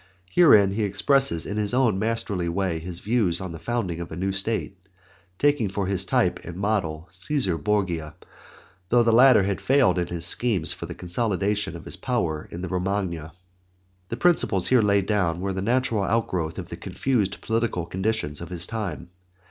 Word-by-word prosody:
Herein 105 - +6
he 105 +3 -2
expresses 105 - +2
in 105 - -4
his 105 +2 0
own 120 -7 +2
masterly 105 -5 -1
way 90 -2 -1
his 85 +1 -6
views 105 -6 +1
on 95 -2 -5
the 80 - -8
founding 100 -6 -2
of 85 - -7
a - - -5
new 95 +3 -1
state, 100 +1 -2 0.6
taking 145 -8 +2
for 100 0 -2
his 95 0 -1
type - - +1
and 85 0 -8
model 90 -6 -1
Cæsar 95 - -1
Borgia, 85 -7 -1 0.8
although 120 0 +5
the 115 -1 +3
latter 125 -4 +7
had 100 0 -2
failed 135 -8 +3
in 90 - -1
his 85 -1 -2
schemes 100 -2 +2
for - - -8
the - - -7
consolidation 100 0 -1
of 85 - -10
his - - -4
power 85 - -2
in 85 - -7
the 95 - -4
Romagna. 90 -4 -2 0.8
The 115 - -4
principles 125 - +2
here 130 -2 +5
laid 100 -2 +2
down 90 -6 0
were 95 +1 -2
the 95 - -3
natural 115 0 +1
outgrowth 95 -7 -1
of - - -6
the - - -7
confused 110 -8 -1
political 110 -6 -1
conditions 95 -5 -2
of 85 - -7
his 90 -1 -2
time. 100 -7 -5
100 Hz, 180 wpm, -24 LUFS, 85-115 Hz, 0.8 s, latter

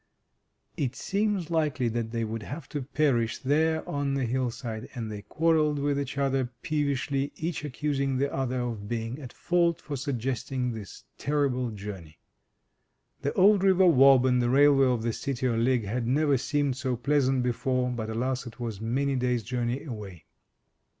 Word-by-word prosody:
It 130 -3 -1
seemed 195 -3 -1
likely 150 -6 +1
that 115 0 -2
they 115 0 -2
would 110 0 -4
have 140 +7 -7
to 145 - -3
perish 130 -4 +1
there 160 +4 +1
on 140 -1 -1
the 135 -2 0
hillside, 120 -1 -3
and 115 -3 -4
they 105 -1 -6
quarrelled 155 +2 +2
with 140 0 0
each 140 0 -4
other 135 -2 +1
peevishly, 140 -2 -1
each 165 0 -3
accusing 140 -1 -1
the 140 +2 0
other 130 -1 -1
of 115 -4 -4
being 115 +3 -3
at 130 -4 -8
fault 170 -1 +1
for 145 - -6
suggesting 130 -1 -2
this 110 -4 -9 0.2
terrible 140 -4 0
journey. 100 -7 -8 1.0
The 140 +1 0
old 200 +1 +5
river 190 -1 +5
Wob 135 -5 +6
and 125 -1 +3
the 120 - +1
railway 135 0 +5
of 125 -3 0
the 115 -1 0
City 130 -1 -2
o' 120 - +1
Ligg 120 +1 +2
had 115 +4 -2
never 145 +2 +3
seemed 140 0 0
so 130 -2 -1
pleasant 135 0 +1
before, 125 +1 0
but, 110 -3 -4
alas! 125 +3 -2
it 120 - -11
was 115 -4 -4
many 135 +5 0
days' 125 -2 0
journey 120 +3 -2
away. 100 - -8
130 Hz, 170 wpm, -28 LUFS, 120-145 Hz, 1.0 s, Wob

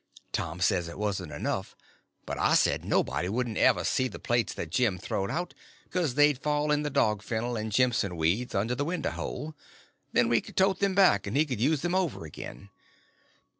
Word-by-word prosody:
Tom 85 +2 -3
says 90 -3 +2
it 85 - -8
wasn't 95 -6 -2
enough; 75 - -3 0.5
but - - -4
I - - +3
said - - +2
nobody 75 +7 0
wouldn't 115 +1 -1
ever - - +4
see 130 - +1
the 115 - -8
plates 120 -5 0
that 80 - -5
Jim 105 -1 +2
throwed 95 +2 -3
out, 175 +1 -3 0.3
because 165 -8 -1
they'd 145 -2 +4
fall 150 0 0
in 150 0 +2
the 150 - -2
dog 105 -6 +1
fennel 120 +2 -2
and 110 0 -3
jimpson 110 -6 +1
weeds 90 +10 0
under 105 +5 +1
the 145 - -1
window 170 +1 -2
hole—then 145 -4 -4
we 115 -1 +3
could - - -13
tote 190 0 +3
them 200 -1 +1
back 185 - +4
and 100 - -1
he 155 - +4
could 125 -7 -4
use 145 +2 +2
them 175 0 0
over 180 - -1
again. 100 +6 -9
120 Hz, 195 wpm, -28 LUFS, 100-150 Hz, 0.5 s, ever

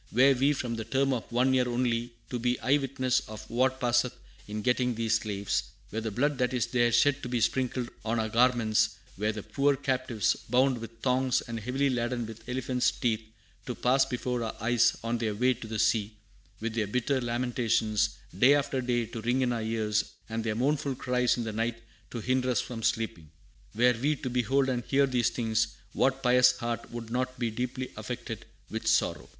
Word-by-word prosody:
"Were 130 +4 +6
we, 135 +3 +3
for 130 -3 -3
the 115 -1 -3
term 135 +3 +1
of 120 -2 -4
one 125 +2 +3
year 125 -1 +2
only, 120 -1 0 0.2
to 125 - -2
be 125 +1 0
eye 135 +3 +4
witnesses 130 -2 0
of 110 0 -9
what 130 +2 +1
passeth 120 0 +1 0.3
in 105 0 -4
getting 125 -1 +1
these 110 0 +1
slaves; 100 -2 -1 0.3
were 110 - -2
the 110 - -2
blood 135 +6 0
that 125 0 +1
is 125 - +1
there 120 -1 +2
shed 145 +4 +3
to 125 - -5
be 120 -1 0
sprinkled 125 +1 0 0.2
on 115 +1 0
our 110 - 0
garments; 110 -3 +3 0.2
were 105 +3 0
the 105 -2 -6
poor 140 0 +2
captives, 130 -5 0
bound 130 +1 +3
with 115 0 -10
thongs, 130 -1 +2
and 115 -1 -5
heavily 130 +5 0
laden 120 -1 -1
with 115 +1 -10
elephants' 125 0 +1
teeth, 115 -3 -1 0.5
to 125 - -3
pass 130 +4 +3
before 125 -1 -2
our 110 - -4
eyes 115 +1 +3
on 115 +1 -1
their 110 -3 -1
way 125 +4 +3
to 115 - -9
the 110 0 -4
sea; 105 -1 +1 0.4
were 115 - -2
their 110 -2 -1
bitter 125 +5 0
lamentations, 120 -3 0 0.2
day 130 +9 +6
after 140 -2 0
day, 120 -1 0
to 115 0 -7
ring 120 +3 +1
in 125 -1 +1
our 115 - -2
ears, 110 -1 0 0.3
and 115 0 -2
their 110 -1 -1
mournful 140 +2 0
cries 125 -1 +1
in 120 - -2
the 110 -1 -4
night 115 +2 -1 0.3
to 120 - -5
hinder 130 +2 +1
us 125 - +2
from 120 -3 -5
sleeping, 110 -9 -1 0.5
were 125 +2 +5
we 150 +3 +2
to 130 -2 -5
behold 130 +3 +2
and 125 -2 -1
hear 140 0 +3
these 125 -3 +1
things, 110 -1 0 0.2
what 135 0 +1
pious 125 0 +6
heart 120 0 -4
would 115 -1 -7
not 130 +1 -1
be 120 -2 -1
deeply 125 +2 -4
affected - - -6 0.2
with - - -5
sorrow!" - - +1
120 Hz, 200 wpm, -29 LUFS, 115-130 Hz, 0.5 s, Were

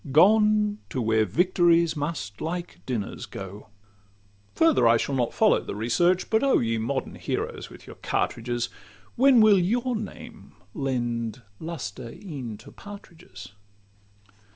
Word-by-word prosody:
Gone 210 +5 +4
to - - -3
where 110 -2 +2
victories 170 - +3
must 145 -9 -4
like 175 +2 -4
dinners 115 -6 -4
go. 100 +2 -9 0.9
Farther 130 -4 +4
I 115 0 +5
shall 140 - -2
not 125 -3 0
follow - - +3
the - - -6
research: 170 - +1
But 220 0 +3
oh! 275 -1 +4
ye 115 -1 0
modern 130 +4 -3
heroes - - -4
with - - -14
your - - -12
cartridges, 120 +1 -2 0.5
When 260 -1 +6
will 210 -3 +6
your 235 +7 0
names 215 -1 -8 0.2
lend 120 -3 -2 0.2
lustre 120 - -6
e'en 135 - -7
to - - -14
partridges? 170 - -12
145 Hz, 130 wpm, -26 LUFS, 115-190 Hz, 0.9 s, When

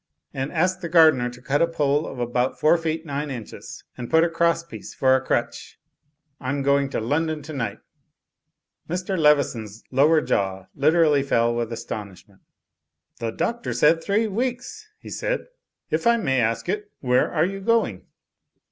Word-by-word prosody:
And 135 +1 -3
ask 185 +3 0
the 170 - -4
gardener 155 -7 +5
to 125 +1 -13
cut 145 0 +1
a 170 - +4
pole 150 -2 0
of - - -8
about 125 +1 -1
four 155 +2 +5
feet 165 -1 -2
nine 145 0 -3
inches, 120 -5 -8
and 120 - -7
put 160 0 +5
a 170 - +1
cross 170 0 +1
piece 170 - -10
for 130 0 +4
a 130 - +1
crutch. - - -3 0.6
Tm 140 +1 -2
going 140 0 +3
up - - -13
to - - 0
London 150 +6 -1
to 155 +2 -8
night." 130 -5 -3 1.1
Mr. 180 +3 -2
Leveson's 135 - +1
lower 150 +5 +4
jaw 95 -8 -1
literally 150 0 +3
fell 120 -4 +1
with 120 -1 -2
aston 105 -3 -6
ishment. 95 +1 -20 0.8
"The 115 -1 -2
Doctor 235 - -2
said 165 +2 +3
three 210 +3 +1
weeks," 245 - -3
he - - -12
said. - - -2 0.5
"If - - 0
I 235 0 +5
may 135 - 0
ask 115 0 -1
it, 205 +2 -3
where 125 -1 +2
are 160 -1 +2
you 195 +2 -4
going?" 210 - 0
150 Hz, 175 wpm, -23 LUFS, 125-170 Hz, 1.1 s, gardener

